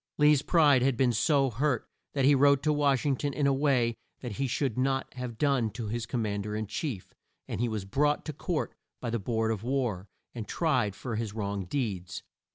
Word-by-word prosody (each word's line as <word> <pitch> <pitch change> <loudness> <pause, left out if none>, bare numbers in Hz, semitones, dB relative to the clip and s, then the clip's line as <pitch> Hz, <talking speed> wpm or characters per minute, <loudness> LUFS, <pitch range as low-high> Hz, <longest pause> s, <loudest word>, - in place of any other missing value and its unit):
Lee's 150 -1 +5
pride 150 -6 +4
had 130 -1 +2
been 125 -2 +3
so 135 +4 +2
hurt 130 +1 0 0.3
that 135 -2 +2
he 145 - +6
wrote 140 0 +4
to 155 - +3
Wash 140 -3 +2
ing 140 -2 +2
ton 145 +1 -2
in 145 - 0
a 140 - +4
way 135 -4 +2 0.3
that 125 - -5
he 135 +6 -2
should 125 -1 -1
not 135 +1 0
have 125 -3 -6
done 135 -4 +2
to 110 0 -5
his 115 +1 -3
Com 120 -2 -1
mand 100 -1 -2
er 105 - -3
in 110 0 -2
chief, 110 - -5 0.3
and - - -3
he 120 - +1
was 105 -3 -3
brought 145 +8 +1
to 155 - -4
court 165 +3 -2 0.3
by 120 - -3
the 115 - 0
Board 110 +2 0
of 110 -3 -2
War 120 -7 -1 0.3
and 115 -4 -6
tried 130 - +1
for 115 -1 -4
his 110 -2 -3
wrong 100 -3 -3
deeds. 95 -6 -3
125 Hz, 220 wpm, -29 LUFS, 110-140 Hz, 0.3 s, he